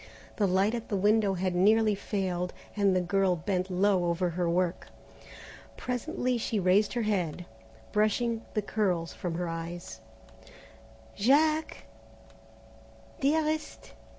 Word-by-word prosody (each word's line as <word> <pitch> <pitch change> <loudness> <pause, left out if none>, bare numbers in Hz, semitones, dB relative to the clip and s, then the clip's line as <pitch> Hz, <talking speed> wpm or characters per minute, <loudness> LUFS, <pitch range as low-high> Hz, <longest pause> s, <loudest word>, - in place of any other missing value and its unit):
The 205 - +2
light 190 +4 +2
at 235 -1 -5
the 205 - -1
window 205 0 +3
had 185 0 -1
nearly 215 +4 +4
failed, 185 -3 -2 0.2
and 200 -2 +3
the 185 - +2
girl 190 0 +1
bent 180 +2 -2
low 185 0 +2
over 175 +1 0
her 175 0 -1
work. 175 +1 0 0.9
Presently 250 -1 -2
she 220 -1 -1
raised 190 +3 +3
her 240 -1 -1
head, 180 -5 -1 0.5
brushing 225 +2 +1
the 210 - 0
curls 185 -6 -1
from 175 -4 -4
her 175 +1 -2
eyes. 165 -6 -6 1.1
"Jack?" 305 +7 +2 1.3
"Dearest?" 310 +2 -1
195 Hz, 125 wpm, -29 LUFS, 180-220 Hz, 1.3 s, nearly